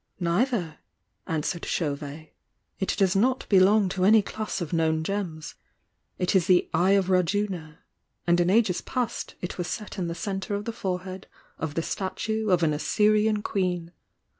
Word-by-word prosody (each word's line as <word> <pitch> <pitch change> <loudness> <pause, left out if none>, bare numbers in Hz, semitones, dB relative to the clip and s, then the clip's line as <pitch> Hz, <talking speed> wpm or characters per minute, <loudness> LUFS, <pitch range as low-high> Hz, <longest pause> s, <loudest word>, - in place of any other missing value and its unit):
"Neither," 175 - 0 0.5
answered 160 +2 -2
Chauvet. 150 0 -3 0.5
"It 190 - 0
does 195 -1 +3
not 255 +6 +2
be 195 - +6
long 200 +2 +5
to 185 0 -2
any 215 +2 +6
class 215 +2 -4
of 170 -1 -5
known 160 -1 +1
gems. 165 -4 -4 0.6
It 180 +1 0
is 185 -2 +3
the 180 -2 +4
'Eye 185 +3 +4
of 190 -1 +2
Raj 185 +1 +2
una' 180 -7 -3 0.2
— - - -51
and 175 0 +3
in 175 0 +3
ages 200 -3 +3
past 250 -3 -3
it 180 - -5
was 175 - -2
set 210 -2 -5
in 175 - -1
the 170 - -4
centre 195 0 -3
of 205 +1 -4
the 230 - -3
forehead 185 -1 -4 0.3
of 155 -2 -4
the 165 - 0
statue 220 +4 -2
of 180 -2 +3
an 155 -2 +3
Assyrian 210 +6 +2
queen. 180 -4 -1
185 Hz, 175 wpm, -26 LUFS, 170-205 Hz, 0.6 s, be